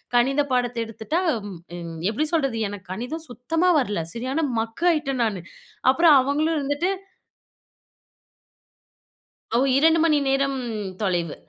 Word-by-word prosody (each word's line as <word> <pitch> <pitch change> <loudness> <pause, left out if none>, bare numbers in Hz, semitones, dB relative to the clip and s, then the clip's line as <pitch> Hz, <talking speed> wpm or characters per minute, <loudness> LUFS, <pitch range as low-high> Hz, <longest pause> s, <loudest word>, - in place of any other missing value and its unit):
கணித 270 +4 +3
பாடத்த 245 -1 0
எடுத்துட்டா, 225 - -2 0.6
ம் 165 -1 -7
எப்டி 305 +8 -1
சொல்றது? 275 -8 +1
எனக்கு 190 -3 -9
கணிதம் 260 +11 -5
சுத்தமா 325 +10 +1
வரல 205 -10 -1
சரியான 265 +6 -1
மக்காயிட்டேன் 275 +2 0
நானு. 200 -5 -2 0.5
அப்புறம் 320 +1 +6
அவங்களும் 305 +4 0
இருந்துட்டு 290 +6 0 2.6
ஒரு - - +5 0.2
2 320 +3 +5
மணி 315 -3 +4
நேரம் 270 0 +1 0.4
தொலைவு. 175 -5 -1
270 Hz, 110 wpm, -24 LUFS, 225-310 Hz, 2.6 s, அப்புறம்